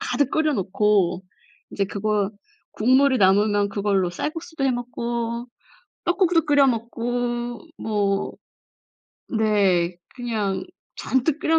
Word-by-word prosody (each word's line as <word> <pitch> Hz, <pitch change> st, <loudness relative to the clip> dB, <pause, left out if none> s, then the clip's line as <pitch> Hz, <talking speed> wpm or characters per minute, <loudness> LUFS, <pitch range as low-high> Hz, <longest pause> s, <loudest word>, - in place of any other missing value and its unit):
가득 290 Hz, -, 0 dB
끓여 310 Hz, -1 st, +2 dB
놓고 195 Hz, -3 st, +1 dB, 0.5 s
이제 200 Hz, -, -1 dB
그거 205 Hz, 0 st, -1 dB, 0.4 s
국물이 260 Hz, +4 st, +3 dB
남으면 205 Hz, +1 st, +3 dB
그걸로 200 Hz, -3 st, 0 dB
쌀국수도 320 Hz, -, -4 dB
해 270 Hz, -, +3 dB
먹고 235 Hz, -1 st, -3 dB, 0.6 s
떡국도 350 Hz, -2 st, +2 dB
끓여 285 Hz, -2 st, +5 dB
먹고 240 Hz, 0 st, -2 dB, 0.2 s
뭐 200 Hz, -2 st, -1 dB, 1.0 s
네 200 Hz, -6 st, +2 dB, 0.2 s
그냥 220 Hz, -6 st, -2 dB, 0.3 s
잔뜩 270 Hz, +4 st, 0 dB
끓여 325 Hz, 0 st, +3 dB
230 Hz, 210 characters per minute, -23 LUFS, 200-265 Hz, 1.0 s, 끓여